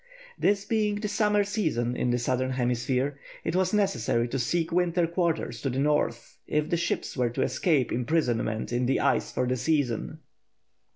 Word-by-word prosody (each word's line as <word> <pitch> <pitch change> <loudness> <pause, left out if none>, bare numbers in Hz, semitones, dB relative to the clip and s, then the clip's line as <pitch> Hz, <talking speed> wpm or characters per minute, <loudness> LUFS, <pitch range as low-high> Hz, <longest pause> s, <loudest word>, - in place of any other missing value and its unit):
This 200 0 +1
being 210 -1 +1
the 210 +1 -3
summer 210 0 +2
season 160 - -1
in 125 - 0
the 120 - +2
southern 130 +1 0
hemisphere, 125 +2 0 0.2
it - - -2
was 185 0 +2
necessary 120 - +1
to 135 - -2
seek 165 +7 0
winter 175 0 +2
quarters 165 -8 -1
to 135 - -1
the 130 - -3
north 140 -4 0
if 150 +1 0
the - - +3
ships 170 - -2
were 125 -3 +1
to 120 - -1
escape 135 0 +1
imprisonment 120 -4 0
in 120 0 +1
the 135 - +2
ice - - +1
for - - 0
the 125 +1 0
season. 125 -3 0
140 Hz, 175 wpm, -27 LUFS, 125-180 Hz, 0.2 s, the